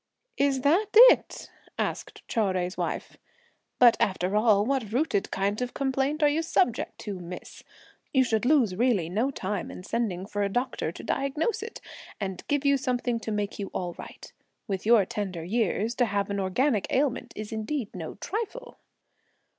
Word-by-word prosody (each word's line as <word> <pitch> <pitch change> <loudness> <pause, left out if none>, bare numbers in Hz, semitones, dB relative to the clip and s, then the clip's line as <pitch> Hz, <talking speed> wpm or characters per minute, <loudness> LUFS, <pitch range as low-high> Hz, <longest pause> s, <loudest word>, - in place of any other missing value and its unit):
"Is 275 -2 +2
that 340 +11 +3
it?" - - +6 0.3
asked - - -4
Chou 230 - -2
Jui's 180 0 -2
wife; - - -4 0.6
"but 240 -2 +7
after 190 0 0
all, 210 -2 +4
what 255 -5 -1
rooted 250 -5 0
kind 200 +3 -1
of 250 0 -3
complaint 275 +3 0
are - - +7
you 295 +3 +1
subject 245 -7 0
to, 200 -3 -5
miss? 180 +1 -9 0.5
you 265 -2 +4
should 220 -3 0
lose 250 -8 +3
really 215 -7 +1
no 220 +9 0
time 200 -7 -3
in 180 - -9
sending 205 -4 -2
for 205 0 -3
a 200 - +1
doctor 245 -6 -2
to - - -10
diagnose 300 +11 -1
it, 445 +1 -8 0.4
and 190 -3 -4
give 290 0 0
you 280 0 +4
something 250 -3 -1
to 220 - -5
make 210 0 -2
you 200 - -3
all 175 -1 -2
right. - - -11 0.3
With 195 -1 -3
your 225 -4 +6
tender 185 -4 -4
years, 220 +3 0
to 245 - +4
have 200 -1 -1
an 200 - -1
organic 210 +4 +1
ailment 270 -1 0
is 215 +1 -6
indeed 220 +2 -3
no 165 -3 -6
trifle!" 460 - -5
230 Hz, 170 wpm, -27 LUFS, 200-275 Hz, 0.6 s, but